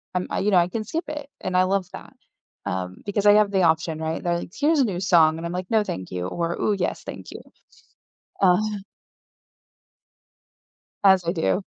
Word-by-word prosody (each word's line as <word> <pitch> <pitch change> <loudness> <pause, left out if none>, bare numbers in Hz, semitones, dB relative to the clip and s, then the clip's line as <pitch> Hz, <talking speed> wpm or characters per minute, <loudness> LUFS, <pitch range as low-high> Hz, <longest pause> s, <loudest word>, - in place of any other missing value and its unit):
I'm, 180 - -1 0.2
you 210 - +2
know 185 - +5
I 175 0 +4
can 220 +4 -3
skip 320 - -4
it, 295 -2 -6
and 185 - -3
I 185 - +5
love 190 0 0
that, - - -10 0.5
um, 90 0 -4
because 205 0 -1
I 205 - +8
have 210 -1 +4
the 190 -1 +2
option, 160 -1 +1
right? 160 0 -3
They're 170 -1 0
like, 175 - -9
"Here's 300 +2 +2
a 265 - +4
new 185 -4 -3
song," 165 -4 +4
and 165 - -6
I'm 170 - -3
like, 180 0 -4
"No, 220 -1 +3
thank 95 - -6
you," 90 -1 -3
or, 170 - -2
"Ooh, 210 - +1
yes. 180 - -2
Thank - - -9
you." - - -9 1.0
Uh 180 -1 +5 2.5
As 190 -3 +5
I 170 - 0
do. 175 +3 0
180 Hz, 200 wpm, -23 LUFS, 165-205 Hz, 2.5 s, I